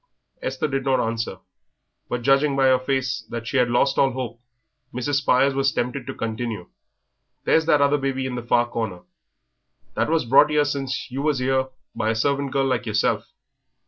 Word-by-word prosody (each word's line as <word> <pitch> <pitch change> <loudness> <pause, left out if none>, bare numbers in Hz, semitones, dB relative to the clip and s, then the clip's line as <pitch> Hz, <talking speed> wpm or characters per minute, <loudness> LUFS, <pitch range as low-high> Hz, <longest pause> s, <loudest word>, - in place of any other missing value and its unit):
Esther - - -2
did 135 -2 -2
not 135 -1 +2
answer, 115 0 -2 0.7
but 125 -1 -3
judging 140 +2 +3
by 135 -1 +3
her 130 -1 +5
face 130 -1 -1
that 115 -1 -5
she 135 - -1
had 125 -1 +3
lost 120 +3 +2
all 135 - +5
hope, 125 -2 -5 0.5
Mrs. 130 +3 -1
Spires 135 0 +3
was 135 -1 +1
tempted 125 +2 -3
to - - -5
continue. 110 -4 -4 0.7
"There's 160 0 +2
that 150 -3 +4
other 140 +1 +3
baby 135 -1 -2
in 130 - -3
the 125 - -3
far 120 0 +2
corner, 110 -7 -4 0.9
that - - 0
was 160 -4 +1
brought 135 +5 +6
'ere 150 -1 +2
since 140 -2 -3
you 135 +2 -3
was 150 -2 +1
'ere 130 +1 +1 0.3
by 110 - -1
a 110 - +1
servant 140 +4 0
girl 135 0 +1
like 125 -2 -1
yerself. 105 -1 0
130 Hz, 185 wpm, -23 LUFS, 120-140 Hz, 0.9 s, brought